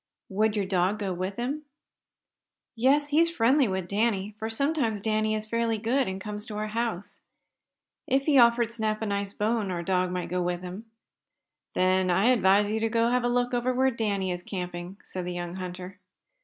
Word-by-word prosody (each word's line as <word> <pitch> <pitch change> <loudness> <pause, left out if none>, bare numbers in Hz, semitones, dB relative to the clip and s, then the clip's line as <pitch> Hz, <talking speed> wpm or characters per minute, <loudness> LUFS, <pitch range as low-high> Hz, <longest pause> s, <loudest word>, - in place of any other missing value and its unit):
"Would 215 +2 +1
your 205 -2 0
dog 190 +2 +1
go 200 -3 -2
with 185 +2 -3
him?" 260 +6 -3 1.1
"Yes, 280 +5 +3
he's 325 +3 +4
friendly 270 -3 +3
with 190 -2 -2
Danny, 205 -1 0
for 220 - -3
sometimes 250 -3 0
Danny 215 +1 0
is 215 0 -3
fairly 230 0 0
good, 240 +5 +1
and 190 0 -4
comes 210 +1 -6
to 210 - -6
our 215 0 -2
house. 220 -4 -3 0.9
If 270 +1 +2
he 280 -2 +4
offered 235 -1 +4
Snap 220 -1 -2
a - - 0
nice 200 -1 -2
bone 215 -1 0
our 175 -2 -3
dog 185 0 +1
might 180 -1 -3
go 180 +1 -1
with 175 0 -2
him." 185 +5 -7 0.9
"Then 185 0 +2
I 190 +7 +3
advise 205 -3 +4
you 220 - 0
to 230 +1 +1
have 250 0 +2
a 245 - +1
look 245 0 0
over 245 +1 0
where 265 +1 +3
Danny 200 -5 -1
is 175 0 -4
camping," 180 0 -6
said 185 - -5
the 180 0 -4
young 175 +1 -5
hunter. 185 +1 -7
215 Hz, 190 wpm, -27 LUFS, 185-235 Hz, 1.1 s, he's